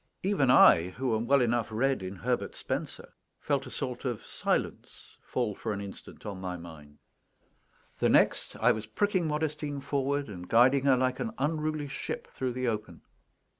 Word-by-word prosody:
Even 180 Hz, -9 st, +2 dB
I, 85 Hz, -7 st, +7 dB
who 120 Hz, +4 st, -1 dB
am 115 Hz, +2 st, -2 dB
well 140 Hz, +1 st, +5 dB
enough 120 Hz, -2 st, +1 dB
read 130 Hz, +2 st, +1 dB
in 95 Hz, +1 st, -5 dB
Herbert 120 Hz, +6 st, -2 dB
Spencer, -, -, -4 dB, 0.3 s
felt 140 Hz, -2 st, -1 dB
a -, -, -7 dB
sort 125 Hz, -2 st, -4 dB
of 120 Hz, -5 st, -3 dB
silence -, -, -3 dB
fall 120 Hz, -5 st, -2 dB
for 110 Hz, +2 st, -4 dB
an 100 Hz, -, -4 dB
instant 100 Hz, -1 st, -9 dB
on 100 Hz, -3 st, -5 dB
my 90 Hz, -1 st, -4 dB
mind. 75 Hz, -4 st, -12 dB, 1.0 s
The -, -, +3 dB
next, -, -, +3 dB
I -, -, +4 dB
was 110 Hz, 0 st, -3 dB
pricking 185 Hz, -, 0 dB
Modestine 150 Hz, -1 st, -2 dB
forward, 140 Hz, +1 st, -1 dB
and 90 Hz, -4 st, -9 dB
guiding 130 Hz, +4 st, +5 dB
her 135 Hz, -2 st, +5 dB
like 130 Hz, 0 st, 0 dB
an 230 Hz, -, -3 dB
unruly 155 Hz, -2 st, -1 dB
ship 135 Hz, -, -5 dB
through 130 Hz, -2 st, -2 dB
the 130 Hz, 0 st, -2 dB
open. 105 Hz, -7 st, -3 dB
125 Hz, 170 wpm, -29 LUFS, 105-140 Hz, 1.0 s, I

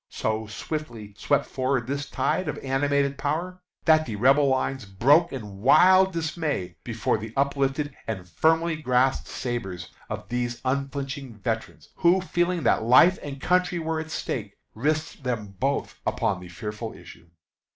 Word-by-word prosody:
So 110 Hz, 0 st, -2 dB
swiftly 115 Hz, -3 st, -6 dB
swept 145 Hz, +6 st, +1 dB
forward 130 Hz, -2 st, -1 dB
this 140 Hz, +2 st, -3 dB
tide 185 Hz, -2 st, 0 dB
of 150 Hz, -, -3 dB
animated 140 Hz, +1 st, +1 dB
power, 175 Hz, +6 st, -2 dB, 0.2 s
that 155 Hz, -2 st, +5 dB
the 110 Hz, -, -4 dB
Rebel 135 Hz, +6 st, +4 dB
lines 130 Hz, -1 st, 0 dB
broke 120 Hz, -, +3 dB
in 105 Hz, -7 st, -7 dB
wild 185 Hz, -, +6 dB
dismay 155 Hz, -, -2 dB
before 115 Hz, 0 st, -1 dB
the 110 Hz, 0 st, -7 dB
uplifted 140 Hz, +1 st, 0 dB
and 95 Hz, -5 st, -4 dB
firmly 160 Hz, -, +2 dB
grasped 130 Hz, -1 st, +2 dB
sabres 95 Hz, -8 st, -4 dB, 0.2 s
of -, -, -5 dB
these 120 Hz, 0 st, -2 dB
unflinching 135 Hz, -1 st, -3 dB
veterans, 110 Hz, +1 st, -4 dB
who, 175 Hz, +2 st, +4 dB
feeling 175 Hz, -2 st, 0 dB
that -, -, +3 dB
life 130 Hz, +11 st, +6 dB
and 140 Hz, -1 st, -7 dB
country 180 Hz, +3 st, +1 dB
were 160 Hz, -1 st, -2 dB
at 155 Hz, 0 st, -6 dB
stake, 105 Hz, -9 st, -4 dB, 0.2 s
risked 150 Hz, +6 st, -1 dB
them 110 Hz, -5 st, -3 dB
both 140 Hz, +4 st, -1 dB
upon 95 Hz, -3 st, 0 dB
the 90 Hz, -1 st, -11 dB
fearful 105 Hz, +5 st, -6 dB
issue. 85 Hz, -, -14 dB
135 Hz, 150 wpm, -25 LUFS, 110-155 Hz, 0.2 s, wild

